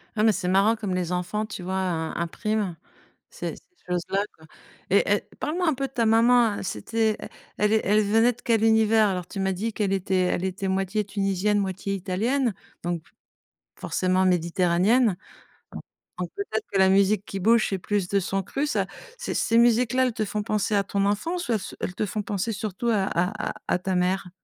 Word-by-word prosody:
Ah! 215 - +1
Mais 220 - +6
c'est 190 -2 -3
marrant 200 +4 +4
comme 210 -4 -3
les 180 -1 -2
enfants, 180 +5 -2
tu 205 -4 -7
vois, 185 +1 -3 0.4
heu, - - -3
impriment 200 +2 -2 0.5
ces - - -5
ces - - -17 0.3
choses-là, 180 +3 0
quoi 160 0 -17 0.4
et - - +4
et - - 0 0.2
parle-moi 350 +4 -1
un 305 - +2
peu 275 +1 -2
de - - -29
ta 235 -3 +1
maman, 230 -1 +4
c'était, 215 - -1
heu, - - -7 0.3
elle 210 0 +2
elle 215 -1 +3
é - - +4
venait 225 +4 +3
de 245 - -18
quel 225 -2 +2
univers? 220 -1 +4
Alors, 180 -2 -3
tu 195 - -6
m'as 190 0 +1
dit 215 +5 -3
qu'elle 205 -2 -1
était 190 0 -1
elle 180 - -1
était 190 +1 -2
moitié 195 +2 0
tunisienne, 195 +1 0
moitié 195 0 -2
italienne, 215 +6 0 0.3
donc 175 -2 -2 0.8
forcément 185 0 +1
méditerranéenne 180 +5 +2 0.6
donc - - -7 0.4
donc 180 -1 -3
peut-être 220 - -3
que 195 - 0
la 190 - +6
musique 200 +1 +3
qui 195 - -5
bouge, 225 +4 +4
c'est 195 - -1
plus 195 0 -1
de 200 - +2
son 195 +1 -2
cru 280 +9 -2
ça. - - 0 0.3
Ces 485 - -4
ces 230 - +2
musiques-là, 240 +2 +4
elles 250 - -1
te 220 -2 -1
font 210 +1 -3
penser 210 0 0
à 200 - +3
ton 200 0 -1
enfance 330 - -1
ou - - +3
elles 220 - +1
se - - -8
elles 180 - -4
te - - -1
font 210 +1 -3
penser 205 +3 -2
surtout 215 +2 -3
à 205 -4 +2
à 185 +5 -1
à 180 - +1
ta 185 0 -2
mère? 180 +1 0
205 Hz, 205 wpm, -25 LUFS, 185-225 Hz, 0.8 s, Mais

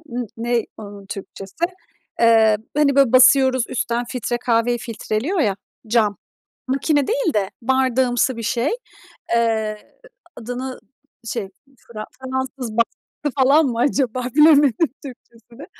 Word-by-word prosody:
ııı, 245 +1 -3
n - - -7
ne 235 0 -1
onun 200 -2 -10
Türkçesi? 195 - -6 0.6
Eee, 225 -2 +5 0.2
hani, 280 -2 +3
böyle, 275 -4 +4
basıyoruz 260 -1 +5
üstten, 240 0 -2
filtre 240 -1 -3
kahveyi 240 0 +1
filtreliyor 230 - -3
ya, 200 -9 +1 0.3
cam, 215 -3 +1 0.5
makine 275 +2 +1
değil 475 - 0
de 200 -3 0
bardağımsı 260 -1 +1
bir 230 - -5
şey. 235 +5 0 0.7
Eee, 220 - -1 0.4
adını, 250 +3 -6 0.5
şey, 225 -4 -3 0.3
Fra 215 -3 -9 0.2
fransız 260 -3 -4
bastı 255 +4 -2
falan 295 +4 +5
mı 235 -3 -2
acaba, 255 -2 0
bilemedim 295 -5 +6 0.3
Türkçesini. 240 0 -13
245 Hz, 120 wpm, -20 LUFS, 225-265 Hz, 0.7 s, bilemedim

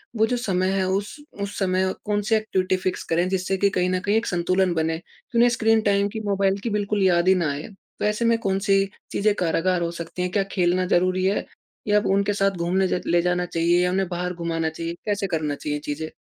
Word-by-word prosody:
वो 220 0 +3
जो 245 - 0
समय 185 -6 0
है 195 -1 +1
उस, 195 +2 -2 0.3
उस 200 0 -4
समय 185 -1 +1
कौन 205 0 0
सी 220 +2 +1
एक्टिविटी 190 -4 0
फिक्स 185 0 -3
करें 170 +2 +2
जिससे 190 0 -1
कि 200 +1 +3
कहीं 180 -2 0
न 185 0 0
कहीं 205 +3 0
एक 225 - 0
संतुलन 185 +1 +1
बने। 160 0 0
तो 235 +6 -9
उन्हें 240 +1 +6
स्क्रीन 225 -2 +2
टाइम 200 -1 +2
की 220 - -5
मोबाइल 195 -1 +1
की 235 - -1
बिल्कुल 205 -1 -1
याद 175 -1 +3
ही 190 - +6
ना 170 -4 0
आए। 140 +2 -5
तो 200 0 -8
ऐसे 210 +2 0
में 230 0 +4
कौन 195 -3 0
सी 195 0 +5 0.3
चीज़ें 210 +1 +2
कारागार 180 0 +1
हो 170 0 -1
सकती 170 +1 -6
हैं? 180 0 -1
क्या 200 +1 +1
खेलना 180 0 +1
ज़रूरी 185 +1 +2
है? 195 +2 0 0.4
या 210 0 +4
उनके 200 +1 +2
साथ 195 -1 +2
घूमने 180 +3 +1
जा 180 - 0
ले 175 0 +3
जाना 180 0 0
चाहिए 170 +1 +2
या 180 - +1
उन्हें 190 0 0
बाहर 180 0 -3
घुमाना 165 -2 -2
चाहिए 165 +1 -5
कैसे 205 -2 -1
करना 155 -5 -1
चाहिए 150 0 -3
चीज़ें? 155 +2 -4
185 Hz, 235 wpm, -23 LUFS, 175-200 Hz, 0.4 s, उन्हें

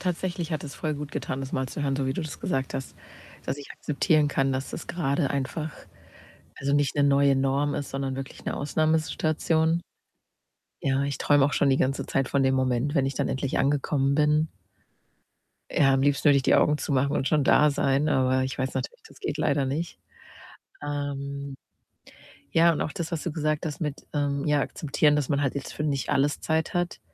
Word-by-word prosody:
Tatsächlich 180 -2 -2
hat 155 - -2
es 140 -3 -7
voll 155 +2 -2
gut 145 0 -6
getan, 130 - -4
das 135 -1 -6
mal 130 0 -1
zu 145 - -5
hören, 135 -1 0
so 135 -1 -1
wie 130 - 0
du 170 - -3
das 155 -2 -7
gesagt 135 0 -2
hast, 135 - -5 0.5
dass - - -2
ich 145 - -10
akzeptieren 150 0 +1
kann, 135 -1 +1
dass 130 +1 -3
das - - -7
grade 140 -3 0
einfach, 150 +3 -3 0.9
also, 140 0 -1
nicht 145 -2 +2
'ne 145 - +2
neue 140 0 +4
Norm 135 +2 +1
ist, 140 -2 -4
sondern 135 -1 -2
wirklich 135 0 -8
'ne - - -2
Ausnahmesituation. 160 +2 +1 1.0
Ja, 135 0 +1
ich 140 -1 -3
träume 145 -1 +4
auch 145 - +1
schon 145 - +2
die 135 - +4
ganze 135 +1 0
Zeit 135 -1 0
von 140 - +1
dem 130 0 +3
Moment, 130 +2 0
wenn 135 -3 +2
ich 135 - -2
dann - - -1
endlich 135 0 -1
angekommen 140 0 +1
bin. 150 +1 +3 1.2
Ja, 135 -2 +4
am 135 - +2
liebsten 145 +1 +2
würde 145 -1 +7
ich 135 - +2
die - - +4
Augen 150 0 +4
zumachen 140 -1 0
und 135 - -1
schon 150 +2 +3
da 150 +2 +5
sein, 140 +1 +1
aber 130 -2 +2
ich 130 - -4
weiß 130 -1 -2
natürlich, 130 - -4
das - - -17
geht - - -3
leider 140 -1 +1
nicht. 155 - -3 0.8
Ähm, 140 -1 -4 1.0
ja, 165 +1 +5
und - - -3
auch 155 - -2
das, 170 0 -5
was 165 - -2
du 170 - -3
gesagt 155 +1 -1
hast 150 - -5
mit, 150 -3 -4
ähm, 145 -1 0
ja, 150 -1 +3
akzeptieren, 150 +1 +1
dass 150 -3 0
man 145 -1 +1
halt 135 -1 0
jetzt 140 - -5
für - - -4
nicht 140 -3 -1
alles 145 +2 +1
Zeit 160 0 0
hat, 175 0 -2
140 Hz, 205 wpm, -26 LUFS, 135-150 Hz, 1.2 s, würde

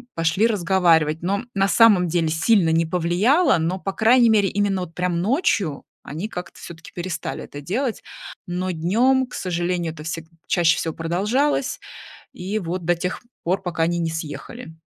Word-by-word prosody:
пошли 165 +7 +2
разговаривать, 170 -6 +2
но 200 +5 -1
на 195 0 +2
самом 200 -4 +5
деле 165 -1 0
сильно 165 +3 +3
не 165 +1 +2
повлияло, 180 - +2
но, 170 +4 -1
по 195 +1 -4
крайней 235 +2 +4
мере, 205 -3 +3
именно 200 -1 0
вот 175 -2 -7
прям 180 -1 -1
ночью 200 - 0 0.2
они 160 +8 -5
как-то 180 -4 -8
всё-таки 165 -1 -11
перестали 175 0 -4
это 145 - -9
делать. 230 - -2 0.5
Но 180 +1 -2
днем, 235 +11 +2
к 250 - -10
сожалению, 175 -2 -2
это 155 - -11
всег 165 0 -5 0.2
чаще 170 -3 +3
всего 160 - -2
продолжалось 215 - 0 0.6
и 195 +4 -3
вот 180 -2 -4
до 175 +1 +3
тех 180 +2 -4 0.2
пор 185 +3 0
пока 175 -3 -2
они 175 +1 0
не 165 -1 -1
съехали. 160 +5 -7
180 Hz, 165 wpm, -22 LUFS, 165-205 Hz, 0.6 s, самом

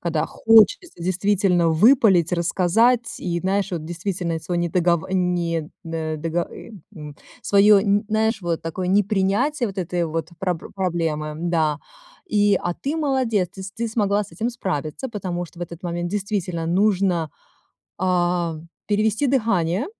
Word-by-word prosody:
Когда 160 -2 -1
хочется 225 - +3
действительно 185 -1 +2
выпалить, 185 - +4
рассказать 200 +8 +2
и 170 -1 -2
знаешь, 195 +2 0
вот, 160 -3 -3
действительно, 175 0 -3
сво 165 +3 -5
не 175 0 0
дого 170 -1 +1
не 175 -4 -1
до 160 -1 -3
дого 165 +2 -2
ы - - -11 0.3
н 150 -2 -9 0.3
Свое, 200 0 +5
нь 205 +1 +2
наешь, 220 +1 +1
вот, 170 -2 -2
такое 170 +3 -4
непринятие 205 +7 +1
вот 195 - -9
этой 175 -1 -1
вот 160 +1 -4
пробл 180 -3 -3
проблемы, 165 -5 -2
да. 160 -3 0 0.5
И, 205 -1 +3
а 175 - -1
ты 290 +4 -3
молодец, 255 - 0
ты 190 - -8
с 195 +1 -8
ты 230 +1 -3
смогла 210 -2 +1
с - - -16
этим 220 +8 -2
справиться. 185 - -4
Потому 185 -6 -4
что 170 - -15
в 175 - -4
этот 170 0 -8
момент 175 0 -3
действительно 195 -5 -2
нужно, 185 -3 +1 0.7
а, 175 -2 0 0.3
перевести 215 +5 +1
дыхание. 215 - +1
180 Hz, 150 wpm, -22 LUFS, 170-205 Hz, 0.7 s, Свое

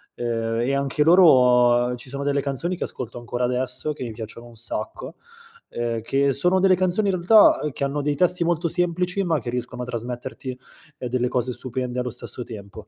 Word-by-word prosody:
ehm, 115 -1 -2
e 135 +3 0
anche 140 +2 +1
loro 125 -8 +5
ci 125 +2 -10
sono 140 +1 -5
delle 140 0 0
canzoni 145 +7 -2
che - - -2
ascolto 120 -1 -7
ancora 120 +1 -4
adesso, 125 +4 -1
che 140 - -13
mi 115 - -5
piacciono 115 +2 -9
un 120 - -15
sacco, 110 -1 -5 0.5
ehm, 115 -1 -3
che 135 +3 +1
sono 180 +7 +3
delle 185 -1 +4
canzoni 185 +3 +1
in - - +1
realtà, 205 +5 +6
uhm, 150 - -2
che 140 - -5
hanno 140 +1 -1
dei 145 0 -1
testi 180 +2 +2
molto 170 0 0
semplici 180 +2 0
ma 165 -4 +1
che 120 +1 -5
riescono 125 0 -4
a - - -5
trasmetterti, 125 +2 -6 0.4
ehm, 125 - -5
delle 125 0 0
cose 125 0 -1
stupende 125 0 -4
allo 125 0 -2
stesso 125 +1 -4
tempo; 105 -1 -10
130 Hz, 200 wpm, -23 LUFS, 120-160 Hz, 0.5 s, realtà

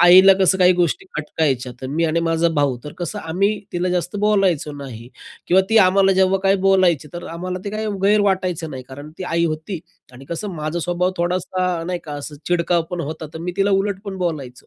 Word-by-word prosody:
आईला 185 +2 +8
कसं 190 0 +4
काही 180 0 +6
गोष्टी 175 +2 0
खटकायच्या, 140 -5 -1
तर 130 - -5
मी 160 +5 0
आणि 165 +1 +1
माझा 165 +1 +2
भाऊ 135 -3 +1
तर 150 - -7
कसं 175 -3 -4
आम्ही 195 +6 0
तिला 175 +1 -1
जास्त 180 +1 -1
बोलायचो 195 -7 +1
नाही. 130 -5 -9 0.4
किंवा 190 +2 +5
ती 225 - +6
आम्हाला 195 0 +5
जेव्हा 190 0 +3
काही 195 +1 +4
बोलायची, 180 -6 +3
तर 175 - -7
आम्हाला 180 +2 -4
ते 200 - -3
काही 215 +1 -3 0.2
गैर 210 +1 +4
वाटायचं 185 -5 0
नाही, 130 -1 -7
कारण 145 +3 -9
ती - - -5
आई 170 0 0
होती 160 +3 -3 0.3
आणि 130 +2 -12
कसं 170 +7 -5
माझा 155 +2 -3
स्वभाव 175 +2 0
थोडासा 180 0 -1
नाही 180 -1 -2
का 150 - -7
असं 145 +1 -7
चिडका 175 0 +2
पण 180 - -3
होता, 155 +1 -5
तर 160 - -7
मी 175 +2 -4
तिला 200 +1 +2
उलट 195 0 0
पण 195 -1 -5
बोलायचो. 145 -8 -4
175 Hz, 210 wpm, -20 LUFS, 155-190 Hz, 0.4 s, आईला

